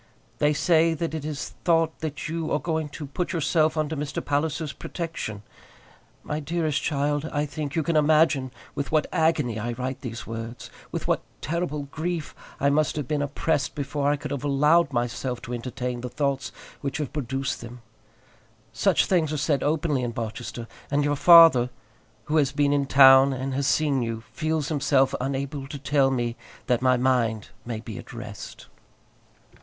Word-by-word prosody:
They 150 0 +3
say 165 +2 +3
that 165 +1 -3
it 160 -3 -4
is 150 -1 -4
thought 165 -2 +2
that 155 -1 -4
you 160 0 -3
are - - +3
going 160 -2 -2
to 150 +1 -7
put 170 +5 -3
yourself 160 -1 +2
under 155 0 -1
Mr. 145 -1 -4
Palliser's 150 +1 -1
protection. 160 - -5 0.8
My 150 - -3
dearest 155 0 -1
child, 145 +1 -1
I 145 0 0
think 145 -1 -5
you 160 - +1
can 165 +2 -1
imagine 155 -3 +3 0.2
with 140 -1 -4
what 155 -1 +3
an 180 - -1
agony 150 -8 +1
I 120 +3 -3
write 130 +2 -4
these 120 -2 -6
words, 115 +1 -7 0.2
with - - -4
what - - +1 0.2
terrible 155 -1 -2
grief 160 +3 -4 0.3
I 140 +1 +3
must 150 +1 +1
have 150 -4 -3
been 150 0 0
oppressed 145 +1 -1
before 145 0 -1
I 145 - +3
could 145 - -7
have 140 -1 -3
allowed 150 +3 +3
myself 120 0 -2
to 120 - -6
entertain 125 0 -4
the 125 - -5
thoughts 140 +1 -1 0.3
which 140 -2 -3
have 150 -2 -4
produced 135 -2 -2
them. 120 0 -10 0.9
Such - - +3
things 165 -5 +1
are 155 - -1
said 145 -2 +1
openly 150 -2 0
in 120 -1 -3
Barchester, 115 +1 -5 0.2
and 145 +1 +1
your 145 0 +1
father, 165 -6 +8 0.5
who 155 +6 0
has 140 -3 +3
been 145 0 +2
in 140 -1 +1
town 135 0 +7
and 130 +1 -3
has 135 0 0
seen 145 -4 +2
you, 115 -1 -3
feels 155 -1 -1
himself 140 -3 +2
unable 135 +1 -3
to 145 - -6
tell 140 0 +2
me 120 -3 -1 0.3
that 125 -1 +1
my 130 -1 +4
mind 120 -4 +1 0.2
may 115 -3 -3
be 110 -3 -7
at - - -11
rest. 110 -3 -8
145 Hz, 180 wpm, -25 LUFS, 130-155 Hz, 0.9 s, father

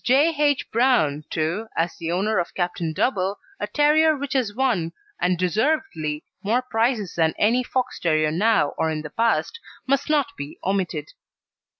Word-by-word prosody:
J. 285 +6 +4
H. 290 -2 +1
Brown, 215 - +2
too, 165 +8 -2
as 165 +1 0
the 165 0 -3
owner 205 +5 +1
of 175 - -4
Captain 175 -2 -2
Double, 195 +2 0 0.2
a - - -2
terrier 305 +1 +4
which 285 +2 -4
has 255 -6 +1
won, 205 -9 0 0.3
and 180 0 +2
deservedly, 180 - -1 0.2
more 235 +5 +1
prizes 225 -5 0
than 160 -1 +1
any 230 +4 +3
Fox 255 0 -2
terrier 155 -2 +2
now 200 -2 +3
or 160 - +2
in 155 -1 -3
the 150 - -8
past, 230 - 0 0.3
must 275 +2 0
not 290 -2 +1
be 145 +1 -7
omitted. 195 - -1
215 Hz, 165 wpm, -23 LUFS, 165-265 Hz, 0.3 s, J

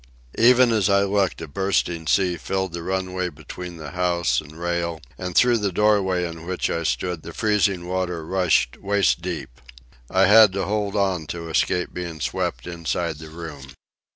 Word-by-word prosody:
Even 125 +1 +6
as 105 -3 +2
I 100 0 +4
looked 100 -3 0
a 80 - -6
bursting 85 -1 -1
sea 90 +1 +2
filled 95 +2 -3
the 85 - -4
runway 95 0 -2
between 85 +3 -9
the 80 -2 -8
house 85 -7 +1
and 75 +2 -14
rail, 85 -1 -2 0.2
and 90 -2 -6
through 120 -2 +5
the 100 -2 -1
doorway 95 -3 +2
in 80 0 -9
which 90 0 -1
I 85 - -1
stood 85 +1 -2
the 85 - -9
freezing 100 -5 +1
water 90 -3 -2
rushed 90 -8 +1
waist 100 -4 +2
deep. 85 -8 -6 0.5
I - - +4
had 105 0 +7
to 95 0 -1
hold 105 0 -1
on 95 -6 0
to 85 -1 -6
escape 90 +2 0
being 85 -3 -5
swept - - -2
inside 85 -2 -3
the 80 0 -10
room. 75 -5 -9
90 Hz, 175 wpm, -23 LUFS, 85-95 Hz, 0.5 s, had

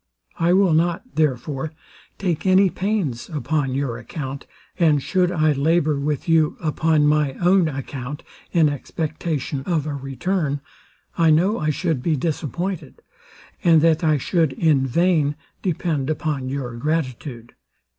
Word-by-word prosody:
I 170 +1 +3
will 190 -3 +4
not, 170 +2 +1
therefore, 150 0 -1 0.4
take 180 -2 -1
any 190 0 +5
pains 185 - -2
upon 145 -3 -1
your 135 -4 -2
account; 140 -2 -6 0.3
and 155 -4 +4
should 180 +5 +1
I 155 -3 +2
labour 150 +1 +2
with 145 +1 -2
you 160 -2 +3
upon 155 -1 +2
my 150 -2 +2
own 180 +3 +3
account, 135 0 -6 0.3
in 165 -3 +4
expectation 150 0 -3
of 165 -5 0
a 150 - -3
return, 140 +3 -2 0.6
I 165 -1 +5
know 180 +8 +3
I 155 - 0
should 155 -2 -1
be 160 +3 +1
disappointed, 160 +2 -3 0.6
and 165 -2 +6
that 165 +1 +3
I 155 -2 +3
should 160 +1 +1
in 145 -5 +2
vain 155 0 +2 0.3
depend 155 -6 -1
upon 150 -4 -2
your 130 -3 -4
gratitude. 130 -4 -3
155 Hz, 135 wpm, -22 LUFS, 140-170 Hz, 0.6 s, and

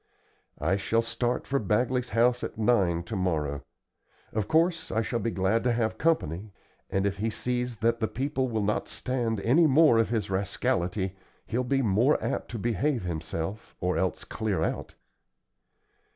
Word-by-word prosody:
I 95 - +1
shall 115 +3 +1
start 120 +1 -1
for 140 0 0
Bagley's 125 +4 0
house 120 +3 +2
at - - -5
nine 100 -7 +2
to 90 - -5
morrow. 75 -7 -1 0.7
Of 105 -2 -1
course 165 +1 +2
I 110 - +1
shall 120 +2 -2
be 115 - -1
glad 95 +2 +1
to 125 - +3
have 115 -1 -1
company, 105 - 0 0.4
and 95 0 0
if 100 -1 0
he 110 +3 0
sees 125 +1 -2
that 115 +2 +1
the 110 - +1
people 135 +2 -1
will 110 -3 -1
not 105 +1 0
stand 120 -4 -2
any 155 +10 +5
more 145 -4 +6
of 115 - +2
his 110 -4 -1
rascality, 95 0 -1 0.3
he'll 120 +2 -1
be 135 +2 +1
more 115 +7 +3
apt - - -3
to 115 - -5
behave 120 +3 0
himself 85 +4 -4
or 90 0 0
else 95 -3 -1
clear 110 -4 -2
out." - - -3
115 Hz, 165 wpm, -28 LUFS, 95-125 Hz, 0.7 s, more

